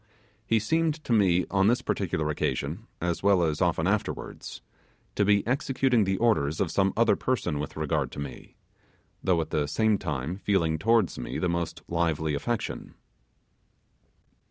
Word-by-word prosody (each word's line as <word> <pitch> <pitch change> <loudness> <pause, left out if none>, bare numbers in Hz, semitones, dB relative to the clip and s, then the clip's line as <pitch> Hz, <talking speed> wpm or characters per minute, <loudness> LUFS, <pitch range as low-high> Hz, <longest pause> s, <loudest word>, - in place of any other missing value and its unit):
He 115 - +3
seemed 160 +8 +1
to 120 - -1
me 90 -5 +3
on 95 0 +3
this 120 +3 +2
particular 75 -1 -1
occasion, 75 - -3
as 85 0 -2
well 100 -3 +4
as 80 -2 -1
often - - +1
afterwards, - - -3 0.5
to 105 - +1
be 100 0 +3
executing 130 -2 +1
the 95 0 0
orders 80 -11 +1
of 95 -5 0
some 95 +1 +2
other 115 0 +4
person 95 - -1
with 75 +1 -5
regard 80 -2 -1
to - - -7
me, 70 -4 -8 0.7
though 90 -3 +2
at 80 - -6
the 75 -1 0
same 105 +7 +2
time 75 +1 -3
feeling 85 -6 +1
towards 115 0 +2
me - - -4
the - - 0
most 85 -1 -3
lively 80 -2 0
affection. 115 +11 -3
95 Hz, 155 wpm, -27 LUFS, 80-110 Hz, 0.7 s, well